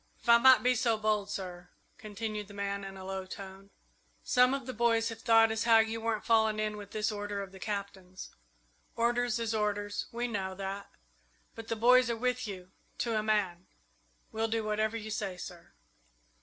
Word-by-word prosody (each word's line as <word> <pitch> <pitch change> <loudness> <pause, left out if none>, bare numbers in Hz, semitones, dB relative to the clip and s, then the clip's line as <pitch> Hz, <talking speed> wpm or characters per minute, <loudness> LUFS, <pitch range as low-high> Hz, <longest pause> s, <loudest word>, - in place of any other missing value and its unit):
"If - - -18
I 235 0 +8
might 260 -3 +7
be 250 0 +4
so 230 -2 +1
bold, 210 -1 0
sir," 180 -3 -6 0.3
continued 215 0 -5
the 205 - -12
man, 200 0 -3
in 195 0 -8
a 190 - -9
low 190 0 -5
tone, 195 +1 -10 0.5
"some 250 +1 +4
of 270 -3 -6
the 255 - -5
boys 230 -1 +2
have 225 0 -8
thought 225 -1 +5
as 220 +1 -1
how 230 -1 +7
you 225 0 +1
weren't 225 -1 -2
falling 220 -2 +3
in 215 0 -1
with 205 -1 -9
this 215 +1 -1
order 205 -1 -4
of 190 - -10
the 190 - -12
Cap'n's. 195 -2 -6 0.6
Orders 240 0 +1
is 230 -1 -2
orders 205 -1 -1
we 240 +1 -2
know 190 -4 -3
that 195 +1 -5 0.6
but 225 0 -9
the 230 - -1
boys 250 +2 +5
are 235 - -1
with 250 0 -1
you, 185 -2 -8 0.3
to 230 -2 -1
a 215 - +2
man. 200 -5 0 0.6
We'll 225 0 -1
do 225 0 -1
whatever 215 +1 0
you 220 -1 -7
say, 200 -4 -3
sir." 175 -1 -10
215 Hz, 195 wpm, -31 LUFS, 200-230 Hz, 0.6 s, I